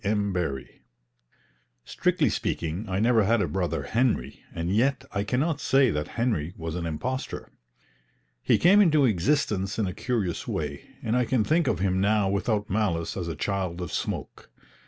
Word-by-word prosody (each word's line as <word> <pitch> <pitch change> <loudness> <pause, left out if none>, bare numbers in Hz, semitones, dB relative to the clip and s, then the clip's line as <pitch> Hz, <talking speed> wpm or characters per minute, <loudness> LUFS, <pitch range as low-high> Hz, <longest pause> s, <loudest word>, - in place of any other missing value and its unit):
M. 100 -1 0
BARRIE 70 -10 -4 1.0
Strictly - - +1
speaking 85 +6 -3
I 95 +1 0
never 115 0 +4
had 115 +3 +3
a 95 - +1
brother 90 +4 -2
Henry, 115 - 0
and 85 +3 -2
yet 135 +4 +2
I 100 - -1
can 125 +4 -1
not 155 0 0
say 135 -3 +4
that 75 -2 -2
Henry 95 -9 0
was 80 -1 -4
an 85 -1 -3
impostor. 130 +12 -4 0.9
He - - +3
came 195 +4 +6
into 155 -7 +4
existence 105 - +1
in 110 - +1
a 90 - -3
curious 105 -8 -2
way, 75 -2 -4
and 110 - 0
I 125 0 +2
can 115 -1 +1
think 160 +7 +2
of - - +1
him 95 0 +1
now 105 0 +2
without 105 +1 0
malice 95 -5 -1
as 90 -3 -3
a 80 - -3
child 95 0 -2
of 90 -3 -5
smoke. - - -4
100 Hz, 175 wpm, -26 LUFS, 85-120 Hz, 1.0 s, came